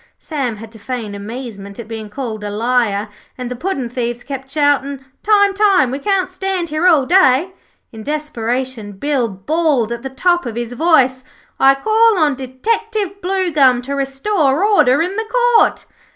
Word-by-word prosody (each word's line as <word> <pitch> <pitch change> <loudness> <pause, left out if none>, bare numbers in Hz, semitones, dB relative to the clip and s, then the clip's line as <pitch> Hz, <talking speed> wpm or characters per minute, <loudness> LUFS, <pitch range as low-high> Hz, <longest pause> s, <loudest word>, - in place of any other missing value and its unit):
Sam 270 -8 -3
had 220 +1 -11
to 220 - -13
feign 225 -2 -5
amazement 200 -1 -8
at 235 - -8
being 220 -2 -7
called 220 -2 -5
a 205 - -3
liar, 220 -1 0 0.3
and 250 -1 -5
the - - -3
puddin' 275 -3 -3
thieves 240 0 -4
kept 265 -1 -7
shouting: 280 -2 0 0.2
'Time, 405 -1 +3
time; 390 -10 +3
we 270 - -3
can't 375 +2 0
stand 370 -2 -2
here 310 +4 +1
all 310 -7 +4
day.' 355 0 +3 0.4
In 220 - -10
desperation, 255 -5 -3
Bill 260 +4 -1
bawled 250 - 0
at 235 0 -4
the 265 - -5
top 350 +3 +1
of 230 - -5
his 240 0 -4
voice: 260 -3 +2 0.4
'I 270 0 +6
call 440 +7 +3
on 305 -4 +3
Detective 395 - -3
Bluegum 315 -10 +2
to 275 +3 -4
restore 275 +3 0
order 325 -9 +4
in 370 +4 -4
the 445 0 -4 0.3
Court.' - - +2
270 Hz, 165 wpm, -17 LUFS, 240-350 Hz, 0.4 s, I